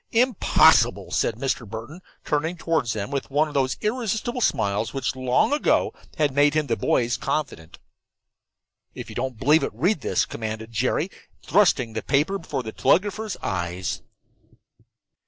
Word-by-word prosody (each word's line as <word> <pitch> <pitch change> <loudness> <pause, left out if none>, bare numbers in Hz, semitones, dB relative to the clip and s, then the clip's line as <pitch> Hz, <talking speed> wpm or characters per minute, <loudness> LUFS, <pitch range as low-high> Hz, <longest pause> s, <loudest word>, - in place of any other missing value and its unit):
"Impossible," 240 -1 +4
said 115 - 0
Mr. 125 -3 -3
Burton, 115 - -8 0.2
turning 160 +4 -1
toward 165 -6 0
them 110 +2 -3
with 140 -1 -3
one 150 +3 +2
of 150 - -9
those 130 -2 0
irresistible 230 +2 -2
smiles 105 - 0
which 130 -2 -2
long 130 - +2
ago 295 - +2 0.2
had 150 -3 +1
made 145 +2 +3
him 155 -1 +2
the - - 0
boys' 120 -1 +1
confidant. 85 - -4 1.2
"If - - -8
you - - -10
don't 130 -1 -3
believe 150 +6 +4
it, 140 - -1
read 170 - +1
this," - - +1
commanded 110 0 -6
Jerry, 130 - 0 0.3
thrusting 145 - +3
the 110 - -3
paper 150 - +1
before 140 -6 -4
the 110 - -6
telegrapher's 205 - +1
eyes. 90 0 -3
140 Hz, 150 wpm, -24 LUFS, 115-170 Hz, 1.2 s, Impossible